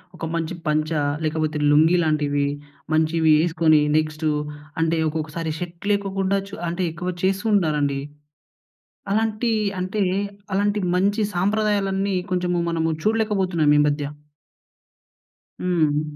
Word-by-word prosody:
ఒక 165 Hz, -, -5 dB
మంచి 165 Hz, +1 st, -2 dB
పంచా, 155 Hz, +1 st, +1 dB, 0.2 s
లేకపోతే 155 Hz, 0 st, -1 dB
లుంగీ 160 Hz, +4 st, +5 dB
లాంటివి 145 Hz, -2 st, +1 dB, 0.5 s
మంచివి 160 Hz, 0 st, +3 dB
యేసుకొని 160 Hz, -1 st, +3 dB, 0.2 s
నెక్స్టు 155 Hz, 0 st, -1 dB, 0.5 s
అంటే 165 Hz, 0 st, +1 dB
ఒకొక్కసారి 160 Hz, +1 st, -3 dB
షర్ట్ 175 Hz, +2 st, -7 dB
లేకోకుండా 195 Hz, -1 st, 0 dB
చు 200 Hz, -, -8 dB
అంటే 175 Hz, +2 st, -2 dB
ఎక్కువ 180 Hz, +2 st, -3 dB
చేస్తూ 195 Hz, +3 st, +1 dB
ఉంటారండి. 150 Hz, -6 st, +1 dB, 1.1 s
అలాంటి 220 Hz, +2 st, +1 dB, 0.3 s
అంటే 185 Hz, +3 st, -2 dB, 0.5 s
అలాంటి 205 Hz, +2 st, +1 dB, 0.2 s
మంచి 200 Hz, +4 st, +2 dB
సాంప్రదాయాలన్నీ 200 Hz, 0 st, +1 dB, 0.2 s
కొంచెము 180 Hz, -1 st, 0 dB
మనము 165 Hz, -1 st, 0 dB
చూడలేకపోతున్నాం 195 Hz, -8 st, +2 dB
ఈ -, -, +6 dB
మధ్య. 145 Hz, 0 st, -1 dB, 1.6 s
హ్మ్. 155 Hz, -5 st, +1 dB
170 Hz, 110 wpm, -23 LUFS, 155-195 Hz, 1.6 s, ఈ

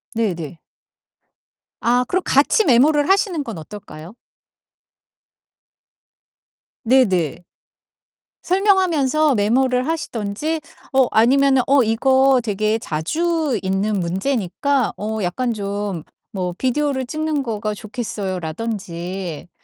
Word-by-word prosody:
네 220 Hz, -5 st, +1 dB
네. 165 Hz, -1 st, -8 dB, 1.2 s
아 245 Hz, +1 st, +2 dB
그럼 370 Hz, -, 0 dB
같이 290 Hz, -, +3 dB
메모를 290 Hz, +4 st, +4 dB
하시는 385 Hz, -4 st, +2 dB
건 230 Hz, -8 st, -7 dB
어떨까요? 170 Hz, 0 st, -10 dB, 2.7 s
네 255 Hz, +2 st, +5 dB
네. 175 Hz, -4 st, -1 dB, 1.0 s
설명하면서 335 Hz, -, +2 dB
메모를 250 Hz, +5 st, +2 dB
하시든지 305 Hz, 0 st, -3 dB, 0.3 s
어 265 Hz, -1 st, +4 dB
아니면은 265 Hz, +4 st, +4 dB
"어 275 Hz, -1 st, +5 dB
이거 260 Hz, +4 st, +3 dB
되게 215 Hz, 0 st, 0 dB
자주 295 Hz, -, -1 dB
있는 195 Hz, +2 st, 0 dB
문제니까 215 Hz, +7 st, -1 dB
어 220 Hz, +1 st, -3 dB
약간 235 Hz, +7 st, -1 dB
좀 200 Hz, -4 st, -4 dB, 0.3 s
뭐 180 Hz, -3 st, -3 dB
비디오를 265 Hz, +2 st, -1 dB
찍는 310 Hz, 0 st, -1 dB
거가 215 Hz, -4 st, -3 dB
좋겠어요."라든지. 190 Hz, -, -5 dB
230 Hz, 215 characters per minute, -20 LUFS, 195-280 Hz, 2.7 s, 네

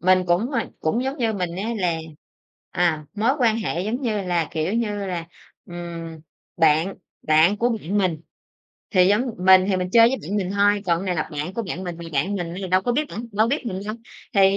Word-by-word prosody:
mình 185 Hz, 0 st, +4 dB
cũng, 180 Hz, +9 st, +1 dB
ờ, 240 Hz, -5 st, +1 dB, 0.2 s
cũng 225 Hz, +11 st, 0 dB
giống 270 Hz, +3 st, -2 dB
như 225 Hz, -2 st, +1 dB
mình 180 Hz, -3 st, -3 dB
á 215 Hz, +4 st, -2 dB
là, 170 Hz, -3 st, 0 dB, 0.7 s
à, 165 Hz, -4 st, +1 dB
mối 220 Hz, +4 st, +2 dB
quan 230 Hz, -3 st, +3 dB
hệ 175 Hz, -4 st, -2 dB
giống 235 Hz, +7 st, -3 dB
như 215 Hz, -4 st, -1 dB
là, 175 Hz, -4 st, 0 dB
kiểu 160 Hz, +5 st, -1 dB
như 210 Hz, -3 st, -1 dB
là, 170 Hz, -3 st, -4 dB, 0.4 s
ừm, 170 Hz, -2 st, -7 dB, 0.4 s
bạn 160 Hz, +3 st, +3 dB, 0.3 s
bạn 160 Hz, +6 st, +4 dB
của 240 Hz, +3 st, +1 dB
bạn 210 Hz, -3 st, -2 dB
mình, 175 Hz, -5 st, 0 dB, 0.7 s
thì 185 Hz, -3 st, +5 dB
giống 210 Hz, +4 st, +3 dB, 0.2 s
mình 185 Hz, 0 st, +6 dB
thì 190 Hz, -, +2 dB
mình 180 Hz, 0 st, -2 dB
chơi 230 Hz, 0 st, +7 dB
với 265 Hz, -, -1 dB
bạn 200 Hz, +6 st, -3 dB
mình 190 Hz, -2 st, -1 dB
thôi, 205 Hz, 0 st, +3 dB
còn 170 Hz, -1 st, +2 dB
cái 190 Hz, -, -5 dB
này 180 Hz, -, 0 dB
là 160 Hz, -, -2 dB
bạn 150 Hz, +6 st, -4 dB
của 230 Hz, -, -2 dB
bạn 185 Hz, -1 st, -5 dB
mình, 175 Hz, -2 st, -5 dB
mà 170 Hz, -, -8 dB
bạn 185 Hz, +9 st, 0 dB
mình 175 Hz, -1 st, -4 dB
giờ 190 Hz, -, -3 dB
đâu 185 Hz, +1 st, +3 dB
có 245 Hz, -, 0 dB
biết 300 Hz, +3 st, 0 dB
bạn 230 Hz, +2 st, -6 dB
đâu 215 Hz, +3 st, +2 dB
biết 275 Hz, -2 st, -1 dB
mình 190 Hz, -3 st, -3 dB
đâu. 215 Hz, -, -3 dB, 0.4 s
Thì 195 Hz, 0 st, +5 dB
190 Hz, 230 wpm, -23 LUFS, 170-215 Hz, 0.7 s, chơi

